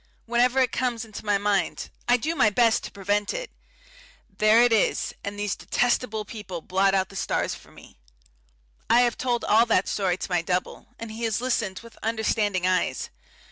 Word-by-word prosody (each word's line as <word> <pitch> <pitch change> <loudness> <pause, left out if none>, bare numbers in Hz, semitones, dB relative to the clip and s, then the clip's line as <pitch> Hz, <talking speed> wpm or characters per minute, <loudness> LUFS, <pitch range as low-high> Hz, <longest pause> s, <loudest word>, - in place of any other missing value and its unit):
Whenever 245 +2 +2
it 255 -3 +3
comes 240 -2 -1
into 215 -1 -9
my 205 -1 +2
mind 200 -3 -1 0.2
I 245 0 +5
do 310 +8 -2
my 215 - +4
best 230 +1 +3
to - - -8
prevent 205 +1 -1
it - - -5 0.8
there 215 +3 +5
it 245 -1 +4
is, 220 - +1
and 200 0 -5
these 205 -1 -1
detestable 240 -3 0
people 205 -5 -7
blot 195 +3 +1
out 190 -1 +1
the 195 - -13
stars - - -1
for - - -13
me. - - -17 0.9
I 240 - +6
have 240 -2 +2
told 245 -2 -1
all 225 +3 +4
that 195 -4 +2
story 185 -3 0
to 190 - -6
my 175 -1 +2
double, 180 +1 -3
and 230 -1 -7
he 220 +2 -8
has 220 -1 0
listened 230 -6 -1
with 230 - -15
understanding 215 -4 0
eyes. 185 0 0
215 Hz, 185 wpm, -25 LUFS, 195-235 Hz, 0.9 s, I